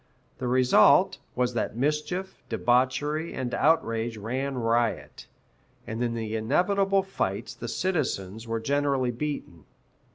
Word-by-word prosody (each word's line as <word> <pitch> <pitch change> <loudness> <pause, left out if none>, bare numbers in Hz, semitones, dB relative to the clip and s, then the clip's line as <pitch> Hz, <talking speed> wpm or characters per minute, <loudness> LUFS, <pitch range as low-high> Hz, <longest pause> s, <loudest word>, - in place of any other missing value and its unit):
The 130 - -2
result 125 0 +5 0.2
was 125 0 0
that 115 -1 -2
mischief, 150 +8 -2
debauchery, 130 +6 +1
and 125 -2 -3
outrage 115 -7 +1
ran 130 +6 -3
riot, 115 -1 -1 0.6
and 115 +2 -3
in 120 -1 -1
the 110 -1 -3
inevitable 195 - +2
fights 195 - -3
the - - -7
citizens 115 - -2
were 115 0 -1
generally 140 0 +1
beaten. 120 - -5
125 Hz, 120 wpm, -27 LUFS, 115-150 Hz, 0.6 s, result